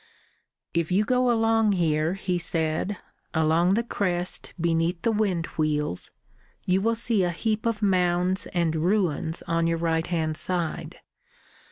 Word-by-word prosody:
"If 170 Hz, -1 st, 0 dB
you 195 Hz, +4 st, +3 dB
go 250 Hz, +2 st, +2 dB
along 225 Hz, -2 st, +3 dB
here," 160 Hz, -1 st, +1 dB
he 185 Hz, -2 st, -2 dB
said, 165 Hz, +3 st, -1 dB, 0.4 s
"along 160 Hz, +4 st, +3 dB
the 230 Hz, -, +1 dB
crest 180 Hz, -5 st, -2 dB
beneath 165 Hz, +1 st, 0 dB
the 230 Hz, -, +2 dB
wind 200 Hz, -6 st, 0 dB
wheels, 150 Hz, -, -1 dB, 0.6 s
you 185 Hz, +1 st, +2 dB
will 230 Hz, +2 st, +1 dB
see 225 Hz, -3 st, +1 dB
a 175 Hz, -, +1 dB
heap 215 Hz, +6 st, -1 dB
of 220 Hz, -2 st, -1 dB
mounds 180 Hz, -1 st, +1 dB
and 170 Hz, -3 st, 0 dB
ruins 170 Hz, -2 st, 0 dB
on 165 Hz, -1 st, 0 dB
your 165 Hz, 0 st, +1 dB
right 165 Hz, 0 st, 0 dB
hand 160 Hz, -3 st, -1 dB
side. 175 Hz, -3 st, -2 dB
175 Hz, 145 wpm, -25 LUFS, 165-205 Hz, 0.6 s, you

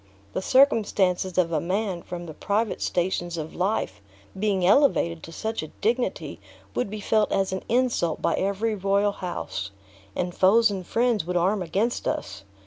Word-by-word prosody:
The -, -, -1 dB
circumstances 195 Hz, -8 st, +3 dB
of 170 Hz, -2 st, +2 dB
a 155 Hz, -3 st, +1 dB
man 190 Hz, 0 st, -1 dB
from 175 Hz, 0 st, -7 dB
the 160 Hz, -, -8 dB
private 210 Hz, +6 st, -1 dB
stations 175 Hz, -1 st, -1 dB
of 155 Hz, 0 st, -5 dB
life 180 Hz, -, -1 dB, 0.4 s
being 195 Hz, -3 st, +1 dB
elevated 185 Hz, -, +3 dB
to 165 Hz, -, -10 dB
such 220 Hz, +7 st, -3 dB
a 155 Hz, -, -6 dB
dignity 210 Hz, -, -2 dB, 0.3 s
would 125 Hz, -, -1 dB
be 215 Hz, +1 st, -5 dB
felt 210 Hz, +1 st, +1 dB
as 195 Hz, -1 st, +1 dB
an 190 Hz, -, -2 dB
insult 240 Hz, -9 st, +1 dB
by -, -, +1 dB
every 200 Hz, +3 st, 0 dB
royal 200 Hz, +1 st, +1 dB
house, 175 Hz, -, -5 dB, 0.5 s
and 180 Hz, 0 st, -2 dB
foes 215 Hz, +5 st, +5 dB
and 190 Hz, -3 st, -5 dB
friends 235 Hz, -2 st, +1 dB
would 180 Hz, +1 st, -1 dB
arm 190 Hz, +4 st, +2 dB
against 200 Hz, +7 st, -1 dB
us. 95 Hz, +1 st, -3 dB
190 Hz, 165 wpm, -25 LUFS, 175-215 Hz, 0.5 s, foes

